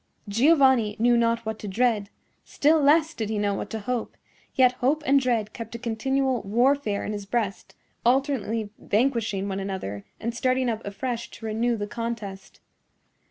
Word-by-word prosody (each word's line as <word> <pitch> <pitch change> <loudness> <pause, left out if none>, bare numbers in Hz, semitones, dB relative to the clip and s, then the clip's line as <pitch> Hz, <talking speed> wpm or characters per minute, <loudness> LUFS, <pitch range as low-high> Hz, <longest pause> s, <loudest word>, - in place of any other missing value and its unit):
Giovanni 255 -2 +4
knew 240 +2 +4
not 230 0 +1
what 220 0 -4
to 210 - -6
dread; 210 0 +1 0.3
still 305 +2 +2
less 310 +3 +4
did 220 -6 -4
he 220 - -1
know 205 -1 +1
what - - -4
to 225 - -4
hope; 245 +1 -3 0.4
yet 255 -2 +5
hope 295 +5 +2
and 275 +1 +5
dread 235 -5 0
kept 230 0 -7
a - - -2
continual 250 +2 0
warfare 235 +1 +1
in 210 - -3
his 205 -1 -6
breast, 205 -4 -2 0.3
alternately 235 -5 +1
vanquishing 220 -4 0
one 195 -1 -3
another 190 - -4 0.2
and 235 +1 -3
starting 255 +1 +1
up 220 0 -5
afresh 235 +3 -4
to 225 - -11
renew 230 +2 0
the 205 - -3
contest. 210 -3 -6
230 Hz, 165 wpm, -25 LUFS, 210-255 Hz, 0.4 s, yet